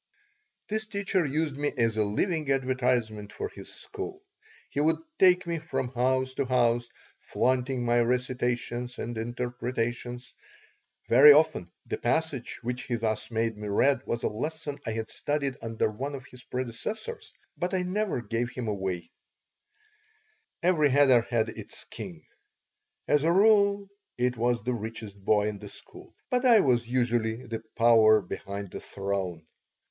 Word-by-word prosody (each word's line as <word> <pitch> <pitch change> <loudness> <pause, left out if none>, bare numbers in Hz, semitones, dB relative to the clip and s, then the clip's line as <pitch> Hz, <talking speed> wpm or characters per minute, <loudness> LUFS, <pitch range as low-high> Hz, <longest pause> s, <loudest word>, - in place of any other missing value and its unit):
This 220 +1 -2
teacher 200 -3 0
used 150 +1 -1
me 145 +1 -1
as 115 -2 +2
a 110 - +2
living 150 - 0
advertisement 125 -5 0
for 425 - -4
his - - -11
school. 400 -1 -7 0.5
He - - -2
would 155 +2 +3 0.2
take 180 -1 +5
me 170 -1 -2
from 135 -5 -3
house 130 +1 0
to 140 - -1
house, 120 -1 +2 0.3
flaunting 130 0 0
my 120 0 +3
recitations 125 0 -1
and 120 +1 -4
interpretations. 120 +1 -3 0.7
Very 135 +5 +9
often 155 - +2 0.2
the - - -4
passage 160 -6 -1
which 125 +2 -3
he 120 - -1
thus 110 -1 -2
made 115 -1 0
me 105 0 -6
read 130 +6 +3
was 115 - -2
a - - +2
lesson 145 +5 -4
I 110 - -1
had 110 0 -3
studied 140 -3 -2
under 115 -1 -1
one 140 +6 -4
of 130 -2 -9
his 125 -1 -13
predecessors, 215 - -5 0.2
but 180 +2 -2
I 185 - +1
never 185 - -1
gave 115 +2 -1
him 125 -2 -5
away 95 -5 -3 1.5
Every 165 -5 +4
cheder 130 -4 +5
had 115 -2 +1
its - - -9
king. - - -8 0.8
As 150 -1 +3
a 165 - +3
rule, 200 +1 +4 0.3
it 125 0 +1
was 120 -1 0
the 125 +2 0
richest 110 -3 -7
boy 105 +1 +3
in 105 -1 -4
the - - -9
school, - - -11 0.2
but 250 0 +2
I 235 -5 +7
was 120 -5 +2
usually 120 -1 0
the 115 -2 -5
power 110 -2 +6
behind 100 +1 -6
the - - -6
throne. 95 -4 -3
125 Hz, 150 wpm, -28 LUFS, 115-150 Hz, 1.5 s, Very